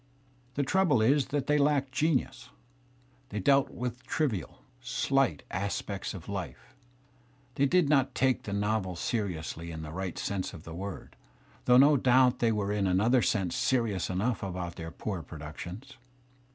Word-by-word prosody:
The 145 - +1
trouble 170 -3 +3
is 135 +5 +3
that 145 -1 -1
they 150 0 +2
lacked 140 -2 +2
genius; 150 0 0 0.8
they 105 - -3
dealt 135 +7 +4
with 125 0 -5
trivial, 130 - -2 0.2
sUght 135 +2 +1
aspects 100 +1 -3
of 90 -2 -9
life; 100 +5 -6 0.8
they 140 +2 +2
did 180 +1 +3
not 140 -3 +2
take 130 -2 +2
the 100 - -7
I - - -1
novel 100 -3 -1
seriously 85 -5 -3
in 80 -1 -6
the 75 - -7
right 95 +1 -4
sense 100 0 -3
of 80 - -11
the 85 - -9
word, 95 +3 -7 0.5
though 125 0 +6
no 140 +3 +7
I 140 - +3
doubt 125 0 +4
they 115 -1 +3
were 105 -2 -1
in 100 -2 +1
another 110 +8 +3
sense 95 -7 0
serious 115 -8 0
enough 100 +5 -1
about 90 -2 -4
their! 80 -1 -6
poor 95 +1 -4
productions. 90 - -9
110 Hz, 165 wpm, -29 LUFS, 95-130 Hz, 0.8 s, no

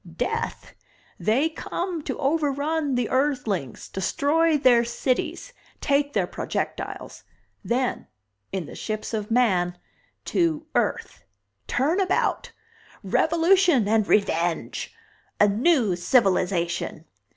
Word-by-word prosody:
"Death! 460 +1 -3 0.5
They 255 +9 +2
come 340 +1 -4
to - - -3
overrun 290 0 0
the 245 -2 0
Earthlings, 250 - -1
destroy 300 - +1
their 245 -4 +5
cities, 315 - -2 0.3
take 285 0 +1
their - - +1
projectiles. - - -5 0.4
Then 250 +1 -1 0.4
in 185 -4 -3
the - - -10
ships 215 +1 -5
of 210 -2 -3
man 185 -7 +2 0.5
to 320 -3 0
Earth! - - -1 0.4
Turnabout! 345 +9 0 0.5
Revolution 335 - +3
and 215 -1 +2
Revenge! 170 -5 0 0.5
A 205 - +6
new 225 - +2
civilization! 175 -5 +1
255 Hz, 95 wpm, -24 LUFS, 205-320 Hz, 0.5 s, A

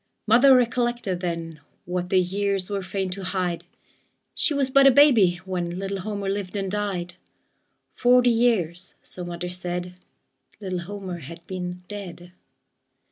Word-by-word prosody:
Mother 250 +5 +7
recollected 240 -5 0
then 165 -3 -4 0.3
What 180 0 -3
the 185 - +4
years 195 +1 -1
were 200 -1 -1
fain 190 0 -3
to 195 +1 -5
hide 180 -2 -2 0.7
She - - +1
was 275 -2 0
but 275 +1 +7
a - - +8
baby 235 -11 +5
when 175 -2 -3
Little 195 +1 -3
Homer 200 0 -4
lived 195 -1 -3
and 195 -2 -2
died; 195 -4 -2 0.8
Forty 250 0 +4
years, 190 -7 0
so 180 - -6
mother 175 0 -5
said, 180 0 -4 0.7
Little 185 -3 -3
Homer 185 -1 -6
had 165 +3 -11
been 180 -1 -5
dead. 180 -4 -8
190 Hz, 140 wpm, -24 LUFS, 180-210 Hz, 0.8 s, a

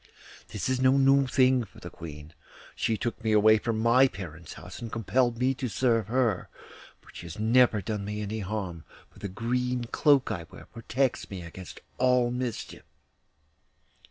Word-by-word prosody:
This - - -4
is 130 0 0
no 130 +1 +4
new 135 0 +4
thing 130 -1 +3
for 110 - -15
the - - -9
Queen; 75 0 -10 0.4
she 110 - 0
took 115 0 -4
me 110 -1 +1
away 110 +1 +6
from 115 0 -2
my 120 +4 +5
parents' 85 - -9
house - - -10
and 115 -2 -6
compelled 120 +2 +1
me 130 +2 +2
to 130 0 -4
serve 115 -3 +1
her; 115 -5 0 0.5
but - - -18
she 85 - -8
has 85 - -8
never 110 -1 +3
done 105 0 -3
me 105 +1 -4
any 105 +1 -4
harm, 95 -5 -4 0.3
for - - -18
the 100 - -5
green 125 +5 -1
cloak 135 +1 +3
I 85 -6 -5
wear - - -13
protects 125 +3 -2
me 95 -3 -7
against 90 +2 -10 0.2
all 125 -1 +3
mischief. 125 -2 -4
115 Hz, 175 wpm, -28 LUFS, 100-125 Hz, 0.5 s, away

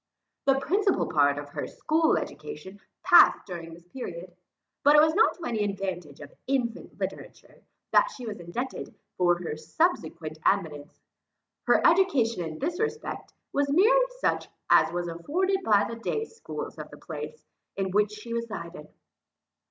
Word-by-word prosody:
The 270 -1 +4
principal 390 +6 +1
part 145 -1 +2
of 145 0 -6
her - - -5
school 315 +1 +1
education 200 - -7 0.2
passed - - +7
during 170 -3 -7
this 170 +1 -14
period; 175 -5 -8 0.5
but 290 +1 +6
it - - +9
was 315 +1 +5
not 420 - +4
to 345 - -12
any 225 -3 -1
advantage 190 -7 -4
of 145 - -11
infant 250 -4 -2
literature, - - -7 0.3
that - - +5
she 255 - -9
was 210 -4 -6
indebted 235 +10 -5 0.2
for 175 -1 +3
her 170 -3 -5
subsequent 160 - -1
eminence; 155 -7 -1 0.6
her - - +4
education 275 - +3
in 160 -1 -6
this 345 +5 -3
respect 450 +1 -4 0.2
was 285 0 +1
merely - - +5
such, - - 0 0.2
as - - +6
was 175 0 -2
afforded 345 - -1
by 205 - +4
the 230 - -6
day 440 - -2
schools 455 - -8
of - - -7
the - - -12
place, 470 - -8 0.3
in 190 -1 -2
which 210 +2 +2
she 210 +2 -8
resided. 180 -9 -5
210 Hz, 155 wpm, -27 LUFS, -, 0.6 s, it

